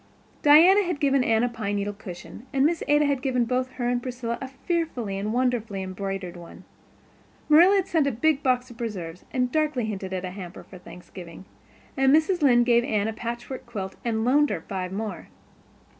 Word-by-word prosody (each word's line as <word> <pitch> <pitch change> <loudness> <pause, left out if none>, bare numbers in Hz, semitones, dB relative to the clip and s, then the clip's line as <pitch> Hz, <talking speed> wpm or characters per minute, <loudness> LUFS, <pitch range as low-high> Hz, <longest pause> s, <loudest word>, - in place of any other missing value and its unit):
Diana 335 +7 +7
had 350 -6 -3
given 275 -2 +2
Anne 225 -1 +2
a - - +3
pine 215 -4 -3
needle 205 0 -2
cushion 200 +4 -10
and 275 -1 +2
Miss 330 +1 +1
Ada 295 +1 +4
had 280 -2 0
given 250 -3 +1
both 255 +2 -2
her 245 -2 -3
and 245 0 0
Priscilla 240 -2 -4
a 265 - -4
fearfully 270 - -3
and 200 +2 -3
wonderfully 230 -5 -1
embroidered 190 -1 -5
one. 170 -1 -12 0.8
Marilla 340 +6 +6
had 390 -1 +1
sent 315 -4 +1
a - - +1
big 280 +5 +1
box 255 -1 0
of 230 - -15
preserves, 185 -7 -6
and 250 -2 0
darkly 300 -6 0
hinted 195 -3 -5
at 185 0 -3
a 180 - -5
hamper 185 -2 -9
for 185 - -13
Thanksgiving, 180 0 -12 0.5
and 270 0 +3
Mrs. 320 +4 +3
Lynde 240 -4 +5
gave 240 -1 +4
Anne 215 -2 0
a - - -4
patchwork 235 +3 -6
quilt 195 -5 -6
and 225 -1 -1
loaned 290 +4 +3
her 165 - -3
five 185 0 -5
more. 205 -2 -5
240 Hz, 195 wpm, -25 LUFS, 200-275 Hz, 0.8 s, Diana